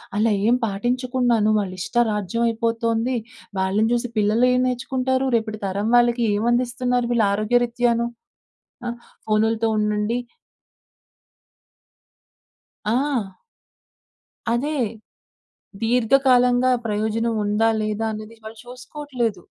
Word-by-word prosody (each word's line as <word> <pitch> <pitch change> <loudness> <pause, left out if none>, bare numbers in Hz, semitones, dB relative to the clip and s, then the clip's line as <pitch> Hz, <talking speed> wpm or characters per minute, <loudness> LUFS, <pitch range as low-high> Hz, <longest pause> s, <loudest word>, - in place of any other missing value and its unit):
అలా 215 +1 +2 0.2
ఏం 240 - +5
పాటించకున్నాను 240 +1 0
వాళ్ళ 195 -3 -1
ఇష్ట 240 - -7
రాజ్యం 210 +2 -1
అయిపోతుంది. 230 +1 0 0.4
వాళ్ళని 195 +4 +1
చూసి 240 +1 0
పిల్లలు 215 +4 +3
ఏం 250 - +2
నేర్చుకుంటారు, 260 +1 -1
రేపటి 220 -2 -2
తరం 200 +3 -2
వాళ్ళకి 240 0 +3
ఏమందిస్తున్నారు 245 +2 0
వీళ్ళు 235 -3 +3
ఆరోగ్యరీత్యాను? 235 +2 +1 0.8
ఆహ్, 240 - -4 0.3
ఫోనుల్‌తో 220 +1 +2
ఉండండి 210 +2 0 2.7
ఆ! 235 -4 -1 1.1
అదే! 290 +6 -1 1.1
దీర్ఘకాలంగా 250 +1 +3 0.2
ప్రయోజనం 220 +2 -1
ఉందా, 210 +2 +2
లేదా? 215 +1 -2
అనేది 215 +1 -9
వాళ్ళు 220 +1 -9
చూసుకోవట్లేదు. 250 - -4
230 Hz, 90 wpm, -22 LUFS, 215-245 Hz, 2.7 s, ఏం